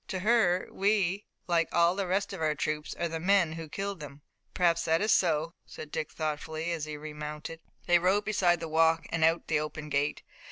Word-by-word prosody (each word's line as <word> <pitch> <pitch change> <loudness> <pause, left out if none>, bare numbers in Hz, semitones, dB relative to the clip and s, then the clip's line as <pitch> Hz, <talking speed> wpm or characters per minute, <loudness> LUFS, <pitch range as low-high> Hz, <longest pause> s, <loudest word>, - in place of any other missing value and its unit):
"To 185 - -3
her 195 -4 +3
we, 200 -1 +1 0.2
like 170 -2 +1
all 170 +1 +3
the 195 -1 -2
rest 195 +3 -1
of - - -6
our 155 -1 +1
troops, 150 +2 -3
are 170 - -1
the 165 0 -4
men 185 -1 +3
who 165 -1 -7
killed 195 +2 -4
them." 145 -1 -10 0.3
"Perhaps 170 -2 +2
that 160 0 +2
is 215 +2 +1
so," 165 -2 +2
said 150 - -10
Dick 155 - -3
thoughtfully, 155 +1 -3
as 160 -3 -2
he 155 -1 -6
remounted. 150 +1 -7 0.3
They 175 0 +5
rode 190 +4 +2
beside 175 -5 +2
the 165 - -4
walk 160 +1 +3
and 165 -1 0
out 165 +1 +4
at - - -39
the 155 -2 +2
open 150 0 -5
gate. 145 +1 -1
165 Hz, 210 wpm, -29 LUFS, 155-180 Hz, 0.3 s, They